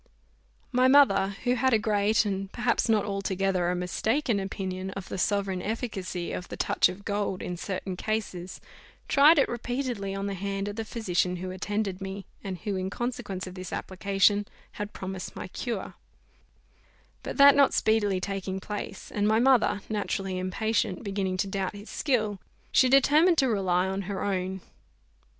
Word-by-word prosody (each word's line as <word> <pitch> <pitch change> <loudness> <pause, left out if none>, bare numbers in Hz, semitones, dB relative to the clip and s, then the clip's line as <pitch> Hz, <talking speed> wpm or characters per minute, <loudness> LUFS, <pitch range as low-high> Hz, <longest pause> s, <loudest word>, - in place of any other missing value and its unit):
My 255 0 +4
mother, 200 -8 +5
who 245 0 +2
had 255 -1 +3
a - - +5
great, 215 0 +2
and 195 -1 -3
perhaps 240 -1 0
not 215 -2 +3
altogether 195 -2 0
a 180 - 0
mistaken, 220 +6 0
opinion, 190 -1 -4
of 195 -1 -7
the - - -4
sovereign 195 -2 0
efficacy 195 -5 -3
of 180 - -5
the - - -7
touch - - +3
of 185 +2 -9
gold 200 -2 -2
in 180 - -4
certain 185 +1 -4
cases, 190 -4 -3 0.5
tried 300 +4 +6
it 280 - +4
repeatedly 240 -5 -3
on 195 0 -3
the 200 - -2
hand 195 +1 -3
of 205 - -4
the 225 0 -4
physician 180 -5 0
who 185 +1 -5
attended 195 0 -2
me, 195 0 -5 0.2
and 190 -2 -4
who, 205 -3 -2
in 185 0 -2
consequence 200 -5 -4
of 185 - -8
this 185 -1 -7
application, 200 +2 +1 0.2
had 210 0 -5
promised 190 -1 -6
my - - -6
cure; 230 0 -4 1.3
but - - -6
that 280 0 +9
not 280 -1 +5
speedily 205 -3 +2
taking 190 0 -3
place, 200 0 -6
and 205 0 +1
my 220 +1 +4
mother, 240 -5 +4
naturally 195 -3 -2
impatient, 190 +2 -1
beginning 195 -2 -2
to 200 - +1
doubt 195 0 -3
his 205 +2 -10
skill, 215 -8 0 0.3
she 260 - +5
determined 300 +6 +5
to 270 - +4
rely 190 -5 +1
on 190 +1 -2
her 195 -2 -3
own. 190 -1 -2
200 Hz, 170 wpm, -27 LUFS, 190-220 Hz, 1.3 s, that